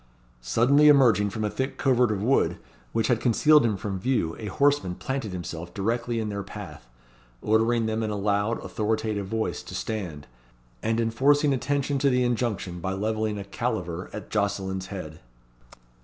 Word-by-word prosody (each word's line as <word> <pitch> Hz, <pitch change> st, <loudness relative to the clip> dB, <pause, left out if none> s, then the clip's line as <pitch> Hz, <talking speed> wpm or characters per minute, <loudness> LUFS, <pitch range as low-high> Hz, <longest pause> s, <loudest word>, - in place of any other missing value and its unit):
Suddenly 125 Hz, -, +4 dB
emerging 120 Hz, -8 st, +5 dB
from 110 Hz, +2 st, -4 dB
a 105 Hz, -, 0 dB
thick 130 Hz, +1 st, -3 dB
covert 125 Hz, -3 st, +3 dB
of 100 Hz, -1 st, -2 dB
wood, 135 Hz, +4 st, +2 dB, 0.3 s
which 115 Hz, -1 st, 0 dB
had 120 Hz, -3 st, +1 dB
concealed 150 Hz, +5 st, +5 dB
him 110 Hz, -4 st, +1 dB
from 95 Hz, -1 st, -4 dB
view, 95 Hz, -7 st, 0 dB
a 110 Hz, -, -5 dB
horseman 140 Hz, -4 st, +1 dB
planted 135 Hz, -3 st, -4 dB
himself 85 Hz, -1 st, -6 dB
directly 115 Hz, +3 st, -1 dB
in 110 Hz, -1 st, -2 dB
their 100 Hz, -1 st, -3 dB
path; 95 Hz, -10 st, -9 dB, 0.6 s
ordering 115 Hz, +2 st, +2 dB
them 110 Hz, 0 st, -1 dB
in 110 Hz, -, -1 dB
a 105 Hz, -, -2 dB
loud, 100 Hz, +2 st, 0 dB
authoritative 110 Hz, -2 st, -1 dB
voice, 110 Hz, +2 st, -2 dB
to -, -, -9 dB
stand; 90 Hz, -10 st, -4 dB, 0.6 s
and 115 Hz, +1 st, 0 dB
enforcing 140 Hz, +6 st, +3 dB
attention 140 Hz, +1 st, -1 dB
to 140 Hz, +1 st, +3 dB
the 125 Hz, -1 st, +2 dB
injunction 115 Hz, -7 st, -1 dB
by 95 Hz, +3 st, -2 dB
levelling 110 Hz, +1 st, -1 dB
a 100 Hz, -, -5 dB
caliver 95 Hz, -5 st, -3 dB
at 105 Hz, -, -8 dB
Jocelyn's 95 Hz, -2 st, -1 dB
head. 80 Hz, -6 st, -7 dB
110 Hz, 165 wpm, -26 LUFS, 100-120 Hz, 0.6 s, emerging